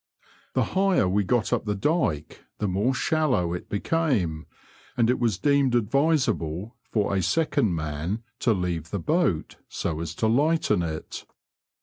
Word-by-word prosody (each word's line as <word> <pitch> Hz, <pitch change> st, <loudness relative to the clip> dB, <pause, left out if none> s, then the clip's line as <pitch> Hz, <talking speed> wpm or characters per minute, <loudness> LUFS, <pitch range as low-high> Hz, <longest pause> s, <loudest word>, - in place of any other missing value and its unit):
The -, -, +3 dB
higher 190 Hz, -, +3 dB
we 100 Hz, +3 st, +2 dB
got 120 Hz, +3 st, +1 dB
up -, -, 0 dB
the 105 Hz, -1 st, -1 dB
dyke, 95 Hz, -, -1 dB
the 105 Hz, -, -1 dB
more 100 Hz, +8 st, +1 dB
shallow 130 Hz, -, +1 dB
it 90 Hz, -, -6 dB
became, 100 Hz, -, 0 dB, 0.5 s
and 120 Hz, 0 st, +4 dB
it -, -, -1 dB
was 115 Hz, -6 st, +1 dB
deemed 140 Hz, -1 st, +2 dB
advisable 120 Hz, -, +1 dB, 0.2 s
for 105 Hz, -2 st, +1 dB
a 95 Hz, -, +2 dB
second 140 Hz, -, +1 dB
man 80 Hz, +7 st, -3 dB, 0.2 s
to 120 Hz, -, +2 dB
leave 90 Hz, -5 st, -2 dB
the 100 Hz, -, -3 dB
boat, 150 Hz, -, 0 dB
so 80 Hz, -, -3 dB
as 85 Hz, 0 st, -5 dB
to 110 Hz, -, +1 dB
lighten 135 Hz, -, +2 dB
it. 80 Hz, -2 st, -5 dB
105 Hz, 150 wpm, -25 LUFS, 85-140 Hz, 0.5 s, and